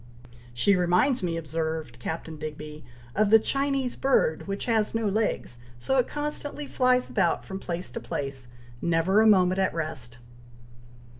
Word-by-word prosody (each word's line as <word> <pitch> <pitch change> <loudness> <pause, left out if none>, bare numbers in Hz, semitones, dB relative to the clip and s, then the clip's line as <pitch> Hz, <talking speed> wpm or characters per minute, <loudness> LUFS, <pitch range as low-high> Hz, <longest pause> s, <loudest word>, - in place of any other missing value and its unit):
"She 120 +12 +3
reminds 180 +9 +2
me," 170 -2 -1
observed 160 -5 -4
Captain 160 +4 -5
Digby, 150 0 -7 0.3
"of 215 0 +3
the 225 - +9
Chinese 275 +1 -1
bird 230 -13 +1
which 195 0 -3
has 225 -2 +1
no 225 -1 0
legs, 200 - -1 0.2
so 265 - +1
it 250 - +2
constantly 295 0 -4
flies 255 -2 +2
about - - 0
from 190 -1 -6
place 175 -1 -3
to - - -5
place, 135 -3 -4 0.3
never 170 +5 +3
a 220 - +5
moment 185 -2 +4
at 190 - +1
rest." 135 -7 -3
185 Hz, 150 wpm, -27 LUFS, 155-225 Hz, 0.3 s, the